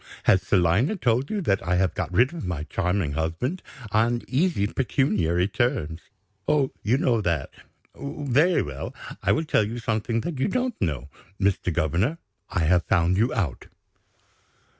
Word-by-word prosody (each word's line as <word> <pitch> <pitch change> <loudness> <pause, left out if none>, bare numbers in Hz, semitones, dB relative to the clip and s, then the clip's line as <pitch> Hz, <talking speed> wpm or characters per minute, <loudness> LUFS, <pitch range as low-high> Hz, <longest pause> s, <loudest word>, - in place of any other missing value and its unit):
Has 95 - +4
Selina 100 - +2
told 125 - +1
you 210 -2 -1
that 100 - +1
I 90 +1 0
have 90 -2 +2
got - - -3
rid 120 - +3
of 170 - -6
my 85 -4 -3
charming 90 -1 -1
husband, 80 - -2 0.3
on 120 +2 +2
easy 140 - +1
pecuniary 105 - +1
terms? 105 - -1 0.5
Oh, 145 -3 +2
you 120 +5 +2
know 120 -5 +2
that? 85 -8 -1 0.4
Very 145 +4 +1
well. 70 -2 -6 0.3
I - - +2
will 160 - +1
tell 115 - +3
you 110 +3 -4
something 115 0 -1
that 160 -2 -4
you - - +2
don't 250 +3 0
know. 75 -7 -2 0.3
Mr. 95 -2 +1
Governor, 85 - 0 0.3
I - - -1
have 85 +2 +3
found 85 +2 +2
you 115 +6 +2
out." 75 -11 -2
105 Hz, 160 wpm, -25 LUFS, 85-135 Hz, 0.5 s, Has